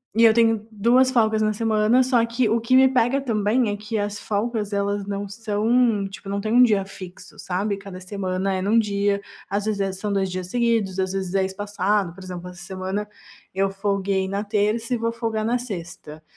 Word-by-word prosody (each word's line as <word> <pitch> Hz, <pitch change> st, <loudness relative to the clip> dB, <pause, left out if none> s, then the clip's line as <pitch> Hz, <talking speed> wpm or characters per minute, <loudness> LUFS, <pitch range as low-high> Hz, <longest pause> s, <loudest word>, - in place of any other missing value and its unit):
e 230 Hz, -, +4 dB
eu 225 Hz, -, +8 dB
tenho 225 Hz, -2 st, +2 dB
2 240 Hz, +5 st, +3 dB
folgas 220 Hz, -3 st, +2 dB
na 215 Hz, 0 st, +2 dB
semana. 220 Hz, +3 st, +3 dB
Só 245 Hz, -3 st, +3 dB
que 235 Hz, +1 st, 0 dB
o 225 Hz, +2 st, +1 dB
que 245 Hz, +3 st, +2 dB
me 265 Hz, 0 st, +7 dB
pega 260 Hz, +1 st, +2 dB
também 225 Hz, -2 st, +1 dB
é 205 Hz, -, -1 dB
que 215 Hz, +2 st, -4 dB
as 205 Hz, 0 st, -2 dB
folgas, 215 Hz, 0 st, -2 dB
elas 200 Hz, 0 st, -1 dB
não 200 Hz, 0 st, -3 dB
são, 220 Hz, +1 st, +1 dB
tipo, 195 Hz, 0 st, -10 dB
não 200 Hz, 0 st, -1 dB
tem 215 Hz, +2 st, -2 dB
um 250 Hz, -, +7 dB
dia 210 Hz, -5 st, +4 dB
fixo, 190 Hz, 0 st, -11 dB
sabe. 195 Hz, +2 st, -2 dB
Cada 195 Hz, -2 st, -9 dB
semana 190 Hz, 0 st, -2 dB
é 185 Hz, -, -1 dB
num 210 Hz, +4 st, +2 dB
dia, 200 Hz, -2 st, +1 dB, 0.3 s
às 200 Hz, +1 st, -1 dB
vezes 195 Hz, -3 st, -1 dB
são 205 Hz, -1 st, -2 dB
2 195 Hz, -1 st, 0 dB
dias 185 Hz, 0 st, -4 dB
seguidos, 225 Hz, -4 st, 0 dB
às 190 Hz, 0 st, -1 dB
vezes 190 Hz, -1 st, -3 dB
é 195 Hz, -1 st, +2 dB
espaçado. 200 Hz, -1 st, -1 dB
Por 190 Hz, +1 st, -12 dB
exemplo, 180 Hz, -1 st, -7 dB
essa 175 Hz, -1 st, -12 dB
semana 190 Hz, +2 st, -4 dB, 0.5 s
eu 195 Hz, 0 st, +2 dB
folguei 195 Hz, -1 st, -1 dB
na 200 Hz, +2 st, -2 dB
terça 215 Hz, +3 st, 0 dB
e -, -, +2 dB
vou 230 Hz, 0 st, -1 dB
folgar 225 Hz, -2 st, -2 dB
na 240 Hz, +2 st, +1 dB
sexta, 170 Hz, -9 st, -8 dB
205 Hz, 205 wpm, -23 LUFS, 195-225 Hz, 0.5 s, eu